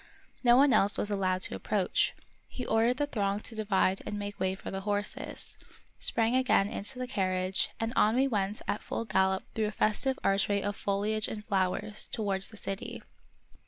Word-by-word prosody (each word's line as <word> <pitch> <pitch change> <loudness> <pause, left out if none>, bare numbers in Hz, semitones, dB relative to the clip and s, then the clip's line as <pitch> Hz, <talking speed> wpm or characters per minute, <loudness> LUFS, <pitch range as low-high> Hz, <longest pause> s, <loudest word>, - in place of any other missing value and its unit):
No 240 0 +6
one 275 -1 +5
else 205 -1 +4
was 210 - -1
allowed 185 -2 0
to - - 0
approach. 200 -4 0 0.3
He 250 - -6
ordered 230 +3 +2
the 290 - +1
throng 200 -7 -1
to 230 - -4
divide 200 -3 +1
and 210 - -4
make 205 0 -6
way 190 0 0
for - - -8
the 195 - -4
horses, 205 0 0 0.4
sprang 225 +2 +3
again 255 -6 +3
into 230 +7 -1
the 255 - -3
carriage, 185 -5 0
and 225 +1 -2
on 215 +2 +4
we 265 +2 +3
went 205 -4 -1
at 205 - -1
full 230 - -4
gallop 190 -2 +1
through 220 -1 0
a - - -3
festive 240 +6 +1
archway 195 +1 +2
of 205 0 -2
foliage 205 +2 -1
and 210 -1 -6
flowers, 200 +1 0
towards 195 -3 -1
the 220 - -13
city. 195 -1 -6
205 Hz, 185 wpm, -30 LUFS, 195-225 Hz, 0.4 s, No